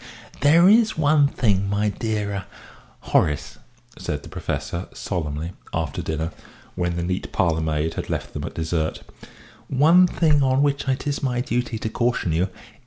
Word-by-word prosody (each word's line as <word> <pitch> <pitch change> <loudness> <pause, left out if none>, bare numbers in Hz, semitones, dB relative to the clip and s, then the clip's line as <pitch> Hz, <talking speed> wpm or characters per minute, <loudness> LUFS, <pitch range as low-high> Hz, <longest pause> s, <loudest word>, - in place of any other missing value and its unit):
"There 165 +6 +6
is 220 0 +5
one 145 -1 +4
thing, 100 -8 +1
my 105 +1 +1
dear 105 0 -2
er 100 0 -4 0.6
Horace," 75 -2 0 0.4
said 75 -4 -4
the - - -10
Professor, 85 +2 -4
solemnly, 85 - -3 0.2
after 80 -3 -2
dinner, 80 +1 -3 0.4
when 90 -1 -1
the 85 - -2
neat 90 +2 -3
parlourmaid 80 -4 0
had - - -5
left - - -3
them - - -4
at - - -7
dessert, 80 -1 -2 0.6
"one 165 +7 +5
thing 155 -4 +3
on 135 +1 +3
which 140 0 0
I 135 -1 +2
think 145 +1 -3
it - - -9
my 125 -3 0
duty 125 -3 -1
to 110 - -3
caution 120 -7 0
you. 85 +4 +1
105 Hz, 165 wpm, -23 LUFS, 85-140 Hz, 0.6 s, There